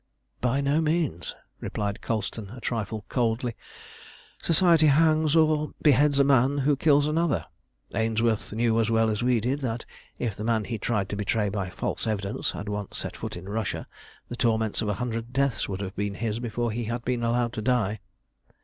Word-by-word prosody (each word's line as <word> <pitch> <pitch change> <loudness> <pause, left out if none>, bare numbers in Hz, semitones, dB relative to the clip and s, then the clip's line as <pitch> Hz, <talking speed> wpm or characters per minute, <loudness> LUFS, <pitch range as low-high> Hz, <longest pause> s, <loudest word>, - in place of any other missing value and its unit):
"By 125 +3 +1
no 140 +3 +2
means," 155 - -1 0.2
replied 100 -1 -3
Colston, 110 -2 -3
a - - -7
trifle 110 -3 -3
coldly. 120 -1 0 0.9
"Society 165 -1 +4
hangs 155 +1 +4
or 155 -1 +3
beheads 145 -1 +4
a 140 - +6
man 135 0 +4
who 140 +1 +3
kills 145 0 +4
another. 165 +3 +1 0.5
Ainsworth 110 0 +1
knew 115 +1 +2
as 110 -1 +2
well 115 -1 +3
as 105 - -2
we 125 -1 +3
did 130 +6 -1
that 120 -3 -3 0.3
if 115 -5 -2
the 105 - -6
man 110 -1 +1
he 115 0 -4
tried 105 -3 0
to - - -3
betray 105 +1 0
by 100 -2 -3
false 90 - -3
evidence 100 -1 -1
had 100 - -6
once 105 -1 -4
set - - -5
foot - - -5
in 90 +2 -9
Russia, 110 +1 -2 0.4
the 120 - -6
torments 110 -3 +1
of 110 - -1
a 105 - 0
hundred 120 -1 -3
deaths 135 -5 +1
would 95 0 -3
have 95 0 -5
been 100 0 -2
his 110 0 -2
before 120 0 -2
he 115 +2 -3
had 115 +1 -4
been 125 -1 0
allowed 120 0 +1
to 110 - -3
die. 110 -3 +1
115 Hz, 185 wpm, -26 LUFS, 105-140 Hz, 0.9 s, a